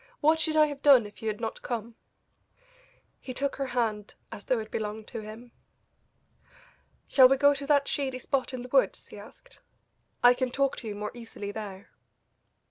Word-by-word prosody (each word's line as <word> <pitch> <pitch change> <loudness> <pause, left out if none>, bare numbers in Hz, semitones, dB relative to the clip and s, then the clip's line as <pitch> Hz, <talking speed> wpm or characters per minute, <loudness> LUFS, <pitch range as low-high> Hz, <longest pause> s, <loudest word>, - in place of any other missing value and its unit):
What 315 +1 +3
should 315 -1 0
I 310 -1 +6
have 290 -2 -6
done 270 -6 +6
if 205 +3 -12
you 220 - -4
had 210 -1 -2
not 225 -1 -5
come?" 235 -1 -5 1.3
He 255 - -8
took 280 +1 -1
her 275 -1 -2
hand 220 -5 -2 0.2
as 205 - -9
though 255 - +1
it 220 -1 -6
belonged 215 0 -4
to 230 - -6
him. 220 +3 -11 1.6
"Shall 260 -2 +7
we 270 - +3
go 285 +1 +5
to 280 0 -6
that 285 -2 +3
shady 265 -3 -2
spot 260 +1 -2
in 255 -2 -6
the 250 - -10
woods?" - - +1
he - - -10
asked; - - -14 0.6
"I 245 0 +8
can 255 0 -2
talk 275 +2 0
to 230 - -8
you 210 - -4
more 210 +1 -5
easily 225 -4 -8
there." 200 -2 -8
245 Hz, 190 wpm, -28 LUFS, 220-275 Hz, 1.6 s, I